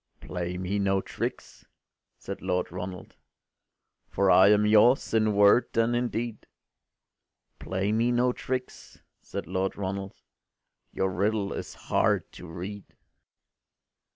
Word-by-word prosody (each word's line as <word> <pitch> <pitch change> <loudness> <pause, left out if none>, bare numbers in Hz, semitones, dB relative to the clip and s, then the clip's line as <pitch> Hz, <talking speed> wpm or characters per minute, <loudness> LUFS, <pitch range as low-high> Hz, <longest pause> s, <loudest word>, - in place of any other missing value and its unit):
” - - -44
“Play 90 0 -5
me 95 +3 -2
no 95 -1 +2
tricks,” - - -6 0.5
said 100 - -7
Lord 90 -2 -1
Ronald, 90 0 -7 0.9
“For 100 -1 +2
I 95 +1 +7
am 105 0 +4
yours 110 +5 +4
in 110 -2 +2
word 100 +5 +4
and 115 +1 +2
in 120 +1 +1
deed. 115 -1 -5 1.1
Play 95 +3 -2
me 115 +3 +2
no 125 +1 +2
tricks,” 130 0 -6 0.2
said - - -6
Lord 95 +2 -2
Ronald, 95 0 -4 0.8
“Your 95 0 -1
riddle 100 +2 0
is - - -7
hard - - 0
to - - -11
read. 95 +5 -8
100 Hz, 125 wpm, -27 LUFS, 95-110 Hz, 1.1 s, I